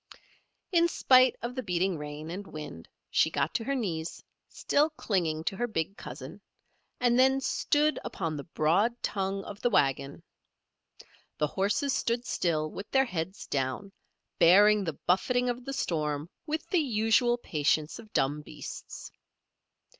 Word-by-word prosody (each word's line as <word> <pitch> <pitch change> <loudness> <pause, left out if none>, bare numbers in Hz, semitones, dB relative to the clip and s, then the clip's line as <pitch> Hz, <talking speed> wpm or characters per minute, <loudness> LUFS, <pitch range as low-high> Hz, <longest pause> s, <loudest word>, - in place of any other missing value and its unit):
In 340 -2 +4
spite 255 -6 +5
of 240 +1 -3
the 255 - -3
beating 185 -3 0
rain 150 +1 -7
and 195 +3 -6
wind 150 - -8 0.2
she - - +3
got - - -1
to - - -1
her 275 - 0
knees, 170 -10 -3 0.3
still 295 +2 +1
clinging 175 - -1
to 195 - -2
her 240 - 0
big 195 -3 -2
cousin, - - -9 0.6
and 245 0 +3
then 265 +1 +5
stood 295 +2 +1
upon 165 -4 -3
the 145 - -5
broad 175 +9 +2
tongue 195 -1 -2
of 205 +1 -9
the 245 - +2
wagon. 140 - +1 1.1
The 150 - +2
horses 205 - 0
stood 235 +1 -1
still 155 -3 0
with 200 - -8
their 265 0 +3
heads 185 -3 -4
down, 135 +8 -2 0.5
bearing 205 +4 +6
the 160 -4 -4
buffeting 245 +7 +2
of 245 +1 -8
the 275 - -4
storm 150 - -2 0.2
with 310 +1 -3
the 360 - +3
usual 240 -2 +2
patience 155 -4 0
of 220 -2 -13
dumb 145 +3 0
beasts. - - -9
195 Hz, 150 wpm, -29 LUFS, 155-245 Hz, 1.1 s, bearing